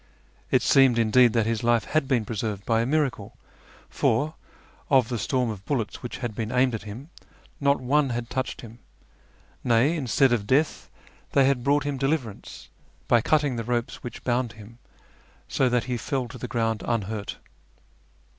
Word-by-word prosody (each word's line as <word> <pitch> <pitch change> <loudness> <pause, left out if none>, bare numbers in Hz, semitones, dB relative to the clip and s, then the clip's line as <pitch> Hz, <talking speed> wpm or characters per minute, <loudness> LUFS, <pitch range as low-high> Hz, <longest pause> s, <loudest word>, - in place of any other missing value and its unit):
It - - +3
seemed, 135 -3 +5
indeed, 115 +1 +4
that 115 -2 +2
his 115 -1 -1
life 120 -1 +3
had 155 -3 0
been 125 -5 +1
preserved 105 -2 -4
by 115 -1 +2
a 115 - -1
miracle, 130 -7 -1 0.5
for, 145 +7 0 0.6
of 130 -5 +4
the 120 -2 -2
storm 125 +2 0
of 100 -3 -8
bullets 120 -6 -3
which 120 - -6
had 120 -3 -4
been 110 +1 -4
aimed 125 0 +2
at 110 - -3
him, 120 +10 -9 0.5
not 140 0 +2
one 140 +2 +2
had 120 -1 -3
touched 130 +1 -3
him; 115 0 -12 0.8
nay, 120 +7 +3
instead 135 -2 +2
of 105 -4 -1
death 150 +6 +1 0.4
they 135 - +5
had 135 -3 +1
brought 145 +1 +2
him 145 -2 -3
deliverance 135 -6 -3 0.4
by 120 - +4
cutting 145 -1 +1
the 115 - -2
ropes 120 +3 -2
which 120 -3 -8
bound 120 -2 0
him, 110 +2 -14 0.7
so 130 - +1
that 125 -1 +1
he 125 -1 -3
fell 130 +1 -2
to 125 - -10
the 125 - -5
ground 115 -3 -1
unhurt. 105 -2 -2
120 Hz, 175 wpm, -25 LUFS, 115-135 Hz, 0.8 s, seemed